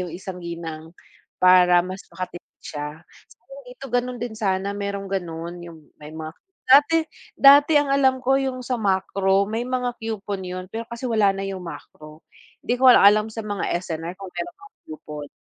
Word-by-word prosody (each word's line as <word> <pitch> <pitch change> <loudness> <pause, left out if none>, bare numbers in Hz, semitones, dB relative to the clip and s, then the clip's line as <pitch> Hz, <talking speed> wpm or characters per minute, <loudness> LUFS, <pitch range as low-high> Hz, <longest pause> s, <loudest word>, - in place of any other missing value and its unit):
yung 180 -1 -4
isang 185 +1 -7
ginang, 165 -1 -7 0.5
para 180 -1 +6
mas 185 +1 -6 0.2
maka 185 +1 -5
tipid - - -17
siya. 150 +2 -7 0.3
Sana - - -16
dito - - -10
gano'n 245 0 -1
din 240 -2 -4
sana 195 -2 -1
merong 200 -1 -4
gano'n, 170 -3 -4
yung 160 -3 -14
may 150 0 -10
mga 160 0 -7 0.4
dati 290 +4 +7 0.4
dati 285 +2 +7
ang 290 -1 0
alam 265 -1 +3
ko 265 +2 +3
yung 260 -1 -3
sa 250 -1 -2
Makro, 195 -1 +1
may 230 +2 -2
mga 250 -1 -1
coupon 210 -3 -4
'yon, 185 0 -6
pero 230 +1 -5
kasi 235 +1 -9
wala 215 -4 +2
na 195 - -5
yung 190 -1 -5
Makro, 155 0 -11 0.4
'di 245 - 0
ko 260 - +5
lang - - +7
alam 210 +1 +6
sa 225 0 -5
mga 205 -1 -3 0.2
S&R 165 0 -5
kung 195 -2 -9
meron 350 - -5
mga 405 +1 -16 0.2
coupon. 150 -2 -8
195 Hz, 185 wpm, -23 LUFS, 170-245 Hz, 0.5 s, dati